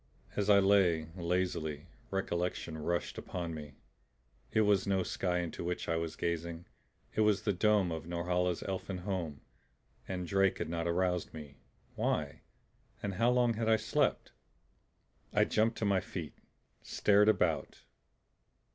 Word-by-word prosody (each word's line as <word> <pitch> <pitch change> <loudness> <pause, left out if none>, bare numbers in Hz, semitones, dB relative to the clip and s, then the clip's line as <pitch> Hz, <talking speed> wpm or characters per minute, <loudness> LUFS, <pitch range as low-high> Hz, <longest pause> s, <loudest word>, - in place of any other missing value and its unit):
As 105 0 0
I 100 - +8
lay, 95 -5 +4
lazily, 85 -4 -1 0.2
recollection 90 -3 -2
rushed 85 +3 -2
upon 85 -2 -4
me. 75 -3 -8 0.8
It 110 - +3
was 100 -2 +3
no 95 -2 +2
sky 90 -1 -1
into 85 -1 -5
which 90 +1 -3
I 85 - +1
was 80 -1 -2
gazing; 85 0 -3 0.5
it - - +1
was 105 -1 +3
the 105 -2 +1
dome 100 -1 +3
of 80 0 -5
Norhala's 90 +1 0
elfin 95 0 -4
home. 85 -8 -3 0.7
And 90 -1 -3
Drake 95 +1 +2
had - - -3
not 85 0 -2
aroused 90 0 0
me. 75 -2 -9 0.4
Why? - - -1 0.6
And 100 - -2
how 115 +6 +3
long 125 -1 +3
had 110 0 -1
I 110 - +6
slept? - - 0 1.0
I - - +5
jumped 115 +2 +1
to 110 - -1
my 100 -2 +3
feet, 85 -4 -6 0.5
stared 105 +1 +4
about. 110 - 0
90 Hz, 145 wpm, -33 LUFS, 85-100 Hz, 1.0 s, I